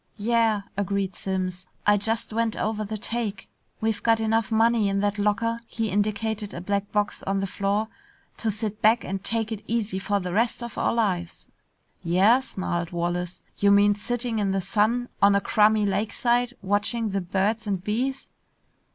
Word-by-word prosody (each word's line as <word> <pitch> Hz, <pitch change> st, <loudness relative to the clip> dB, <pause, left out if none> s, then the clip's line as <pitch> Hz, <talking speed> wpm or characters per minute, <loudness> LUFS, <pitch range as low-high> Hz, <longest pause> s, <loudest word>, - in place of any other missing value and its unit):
"Yeah," 225 Hz, -1 st, +2 dB
agreed 200 Hz, -1 st, -1 dB
Simms. 185 Hz, -1 st, -3 dB, 0.2 s
"I 210 Hz, -, +6 dB
just 220 Hz, +2 st, -2 dB
went 230 Hz, 0 st, 0 dB
over 215 Hz, 0 st, -1 dB
the 215 Hz, +1 st, -4 dB
take. 215 Hz, -2 st, -3 dB, 0.3 s
We've 220 Hz, -1 st, -1 dB
got 225 Hz, -1 st, +3 dB
enough 225 Hz, -1 st, +1 dB
money 225 Hz, -1 st, +3 dB
in 195 Hz, 0 st, 0 dB
that 205 Hz, 0 st, 0 dB
locker" 230 Hz, +3 st, +1 dB
he 225 Hz, -2 st, -2 dB
indicated 210 Hz, +1 st, -1 dB
a -, -, -4 dB
black 200 Hz, +2 st, -2 dB
box 210 Hz, 0 st, 0 dB
on 195 Hz, 0 st, -1 dB
the 195 Hz, -, 0 dB
floor 200 Hz, +3 st, -1 dB, 0.5 s
"to 225 Hz, -, -1 dB
sit 215 Hz, 0 st, -4 dB
back 225 Hz, +2 st, +4 dB
and 190 Hz, +1 st, -4 dB
take 225 Hz, -1 st, -1 dB
it 215 Hz, -2 st, -5 dB
easy 215 Hz, -4 st, -1 dB
for 200 Hz, +1 st, 0 dB
the 180 Hz, -2 st, -4 dB
rest 230 Hz, +3 st, +1 dB
of 235 Hz, -2 st, -7 dB
our -, -, +1 dB
lives." 185 Hz, -7 st, -1 dB, 0.6 s
"Yeah?" 190 Hz, +9 st, +5 dB
snarled 175 Hz, -9 st, -3 dB
Wallace. 175 Hz, +1 st, -3 dB, 0.2 s
"You 200 Hz, -, +3 dB
mean 205 Hz, +1 st, +6 dB
sitting 235 Hz, +2 st, -2 dB
in 200 Hz, -2 st, +1 dB
the 195 Hz, -, +1 dB
sun 225 Hz, +5 st, +1 dB
on 200 Hz, 0 st, +6 dB
a -, -, +4 dB
crummy 210 Hz, +1 st, +3 dB
lakeside, 235 Hz, +5 st, 0 dB
watching 205 Hz, +3 st, 0 dB
the 195 Hz, 0 st, -1 dB
birds 200 Hz, +5 st, 0 dB
and 190 Hz, -3 st, -1 dB
bees?" 255 Hz, +6 st, -2 dB
210 Hz, 175 wpm, -25 LUFS, 195-225 Hz, 0.6 s, I